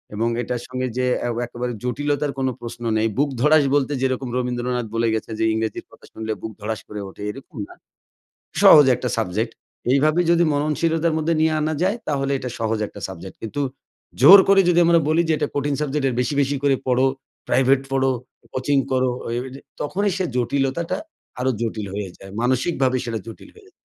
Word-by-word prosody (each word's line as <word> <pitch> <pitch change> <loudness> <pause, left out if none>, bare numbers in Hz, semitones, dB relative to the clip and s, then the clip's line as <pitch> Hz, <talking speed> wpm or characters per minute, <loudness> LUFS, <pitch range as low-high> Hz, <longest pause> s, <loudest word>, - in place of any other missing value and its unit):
এবং 115 +2 0
এটার 120 0 -3
সঙ্গে 130 0 -3
যে 130 - +1 0.2
অ্যা - - -1 0.2
একেবারে 120 +1 -4
জটিলতার 145 +3 -1
কোন 130 - 0
প্রশ্ন 120 0 -7
নেই। 110 +1 +2
বুক 145 +1 +2
ধড়াস 150 +2 +5
বলতে 145 0 +1
যেরকম 130 -1 -1
রবীন্দ্রনাথ 125 -1 -2
বলে 115 0 +1
গেছে, 110 0 -3
যে - - +1
"ইংরেজির 110 0 -3
কথা - - -17
শুনলে 110 0 -4
বুক 110 - -5
ধড়াস 110 +1 -4
করে 105 -1 -6
ওঠে" 100 - -13
এরকম 135 - -13
না। - - -14 0.9
সহজ 150 -3 +9
একটা 125 +1 -3
সাবজেক্ট। 110 +2 -1 0.4
এইভাবে 155 +5 +3
যদি 170 0 +4
মননশীলতার 160 +2 +1
মধ্যে 165 +1 0
নিয়ে 160 0 +3
আনা 155 +1 0
যায়, 195 +5 +2
তাহলে 140 -1 0
এটা 125 -1 -5
সহজ 110 0 -1
একটা 100 - -12
সাবজেক্ট। 95 0 -9
কিন্তু 115 +6 -4 0.6
জোর 180 +10 +11
করে 195 0 +6
যদি 175 - +4
আমরা 170 -1 +5
বলি, 160 +2 +3
যে - - +3
এটা 150 - -1
কঠিন 145 0 0
সাবজেক্ট, 145 -1 -1
এর 125 - -2
বেশি, 125 +4 -1
বেশি 140 +1 -1
করে 140 -1 +3
পড়ো, 130 +1 +3 0.4
প্রাইভেট 135 +1 +3
পড়ো, 135 0 +2 0.4
কোচিং 135 +2 +1
করো, 130 0 +2 0.2
ঐ - - -4 0.2
ঐযে 130 +2 -10 0.2
তখনই 200 +6 0
সে 185 - -1
জটিলতাটা 140 +8 0 0.4
আরো 130 - +1
জটিল 110 -3 -3
হয়ে 100 -2 -4
যায়। 95 - -12
মানসিকভাবে 130 +1 +1
সেটা 115 -2 -3
জটিল 115 - -11
হয়ে 435 - -17
যায়। - - -23
130 Hz, 190 wpm, -22 LUFS, 120-150 Hz, 0.9 s, জোর